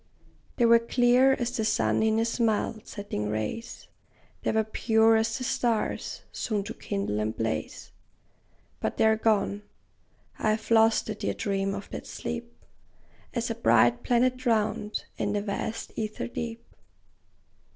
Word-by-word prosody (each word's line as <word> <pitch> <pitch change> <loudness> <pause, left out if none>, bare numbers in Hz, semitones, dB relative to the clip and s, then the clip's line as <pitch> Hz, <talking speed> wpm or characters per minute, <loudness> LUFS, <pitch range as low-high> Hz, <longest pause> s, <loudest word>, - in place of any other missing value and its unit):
They 240 - +3
were 230 0 +7
clear 245 +3 +4
as 245 -1 -2
the 220 - 0
sun 220 - +2
in 220 0 +2
his 230 +2 0
mild, 220 -1 0
setting 105 - -4
rays; 110 - -4 0.5
They - - 0
were 220 0 +2
pure 220 +1 +3
as 225 +1 +1
the 255 - -5
stars, 235 -2 -1
soon 210 -3 -2
to - - -6
kindle 195 - -3
and 110 +1 -2
blaze; 110 -9 -3 0.9
But - - -2
they - - +4
're 220 0 +5
gone! 210 -2 +1 0.8
I 215 - +1
have 220 +1 -5
lost 225 0 +5
the 215 - -3
dear 210 - -3
dream 195 -2 -1
of 200 - -7
that - - -6
sleep, 80 +1 -6 0.7
As 235 -1 -1
a - - 0
bright 120 - +4
planet 250 +1 +2
drowned 215 -4 0 0.2
in - - 0
the 205 - 0
vast 210 +2 -4
ether 215 -1 -3
deep. 235 -1 -5
220 Hz, 150 wpm, -27 LUFS, 200-230 Hz, 0.9 s, were